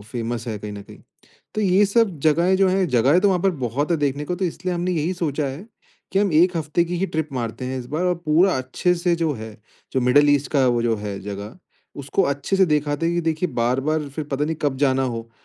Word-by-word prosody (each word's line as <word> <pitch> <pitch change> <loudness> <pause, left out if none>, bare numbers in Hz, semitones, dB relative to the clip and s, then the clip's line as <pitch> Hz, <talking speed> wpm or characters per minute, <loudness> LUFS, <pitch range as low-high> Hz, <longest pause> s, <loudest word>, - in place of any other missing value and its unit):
Famous 120 0 -4
है 110 -2 -3
कहीं 105 0 -7
ना 100 0 -8
कहीं। - - -14 0.6
तो 215 - -1
ये 195 0 +4
सब 200 -5 +1
जगहें 170 +5 +3
जो 195 -1 +3
हैं, 185 0 +2
जगहें 130 +7 +3
तो 205 - +4
वहाँ 180 -2 +1
पर 195 - +3 0.2
बहुत 140 +8 -2
है 170 - +3
देखने 145 0 -1
को, 180 - -2
तो 190 - -2
इसलिए 180 +1 -3
हमने 175 +1 -1
यही 165 +2 0
सोचा 150 -4 -2
है, 140 +10 -6 0.5
कि 195 - +2
हम 200 -3 +2
1 170 +3 +4
हफ़्ते 160 +2 0
की 175 +1 -4
ही 195 - 0
ट्रिप 160 -3 -3
मारते 120 -1 -4
हैं 130 +1 -3
इस 125 - -6
बार 155 +7 -2
और 180 0 +2
पूरा 170 +3 +4
अच्छे 130 +7 0
से 175 0 +1
जो 165 -2 0
है, 110 -1 -8 0.4
जो 130 - +1
मिडल-ईस्ट 145 +2 +3
का 135 -3 +3
वो 120 -1 +1
जो 115 -1 +1
है, 105 -1 -5
जगह 100 - -7 0.4
उसको 140 +8 0
अच्छे 140 +4 -1
से 190 - +5
देख 150 -2 +1
आते 145 +3 -1
हैं 170 - 0
कि 175 - +1
देखिए 165 +1 -1
बार-बार 135 +6 0
फिर 145 +2 -5
पता 145 0 -2
नहीं 160 +1 -2
कब 145 -2 0
जाना 135 -1 +2
हो, 115 -2 -4
150 Hz, 250 wpm, -22 LUFS, 130-175 Hz, 0.6 s, से